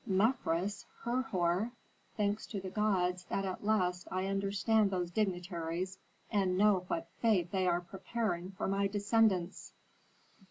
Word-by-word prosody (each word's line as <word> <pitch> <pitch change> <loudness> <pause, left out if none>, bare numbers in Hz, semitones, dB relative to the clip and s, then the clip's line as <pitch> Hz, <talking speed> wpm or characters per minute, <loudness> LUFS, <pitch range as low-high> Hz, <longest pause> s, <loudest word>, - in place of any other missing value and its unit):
Mefres 195 -2 +1 0.2
Herhor! 225 -4 0 0.4
Thanks 210 0 0
to 205 - -4
the 190 -1 -6
gods 180 -4 +1
that 195 - -1
at 185 +1 -4
last 185 -4 +1
I 185 0 -1
understand 200 +2 +2
those 180 -2 -2
dignitaries 180 -2 -2 0.3
and 190 -4 +2
know 200 -2 +4
what 165 -1 -3
fate 190 -7 +3
they 190 -2 +1
are 175 0 +2
preparing 190 0 -3
for 195 - -3
my 195 +1 +2
descendants." 200 -2 +1
195 Hz, 130 wpm, -33 LUFS, 180-210 Hz, 0.4 s, know